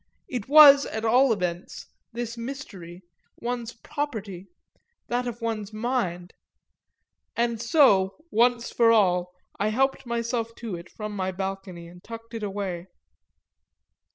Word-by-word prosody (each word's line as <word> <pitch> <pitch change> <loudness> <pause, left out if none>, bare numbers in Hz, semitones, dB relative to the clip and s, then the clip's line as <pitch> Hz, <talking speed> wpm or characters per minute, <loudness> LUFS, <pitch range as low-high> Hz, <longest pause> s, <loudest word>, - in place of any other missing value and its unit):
It 245 -6 -4
was 285 -2 +9
at 220 +1 -4
all 250 +3 +4
events, 180 -4 -3 0.3
this 235 0 -5
mystery, 205 -9 -8 0.4
one's 240 -1 -4
property 215 - -5 0.6
that 245 +1 -1
of 235 0 -6
one's 220 -3 -3
mind; 215 -6 -2 1.0
and 235 -1 0
so, 230 -8 +4 0.2
once 240 +1 +2
for 230 -1 +4
all, 180 -5 +3 0.3
I 205 - +1
helped 270 +3 0
myself 235 -1 -2
to 225 -6 -5
it 170 +1 -10
from 210 -1 -7
my 190 -1 -2
balcony 190 -2 -6
and 175 +1 -15
tucked 230 +1 -10
it 225 - -5
away. 195 -3 -4
225 Hz, 125 wpm, -26 LUFS, 190-240 Hz, 1.0 s, was